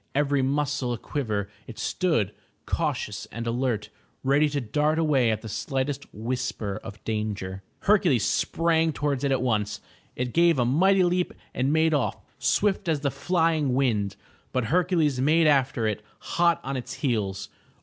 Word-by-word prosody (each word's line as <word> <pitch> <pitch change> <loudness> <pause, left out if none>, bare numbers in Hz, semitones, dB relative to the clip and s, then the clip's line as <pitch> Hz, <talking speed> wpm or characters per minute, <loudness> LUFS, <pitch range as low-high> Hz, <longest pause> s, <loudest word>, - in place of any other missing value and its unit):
Every 145 -1 +2
muscle 140 -2 0
a - - -3
quiver 110 -6 -2 0.2
it 115 - -9
stood, 160 - 0 0.3
cautious - - -2
and 115 0 -6
alert, 115 -2 -1 0.3
ready 140 +3 +3
to 145 0 -1
dart 150 +6 0
away 145 -7 +3
at 110 0 -1
the - - -6
slightest 135 +5 -2
whisper 110 -3 -3
of 105 -1 -10
danger. 105 -4 -3 0.2
Hercules 180 - +3
sprang 165 -1 +1
towards 145 -2 -1
it 140 - +1
at 130 -1 +1
once. 105 -4 0 0.4
It 125 -1 -3
gave 170 -2 +4
a 120 - +2
mighty 185 +9 +4
leap 180 0 0 0.2
and 130 +2 0
made 160 +1 +3
off, 145 -4 0 0.2
swift 200 -3 +1
as 150 -3 +1
the 140 -2 0
flying 160 -6 +1
wind. 105 -7 +1 0.4
But 130 -3 0
Hercules 165 -7 +2
made 160 +4 +4
after 135 -5 +3
it, 105 -1 -1 0.2
hot 170 -1 +1
on 135 +1 -3
its 125 - -5
heels. 105 -8 -2
135 Hz, 160 wpm, -26 LUFS, 115-160 Hz, 0.4 s, gave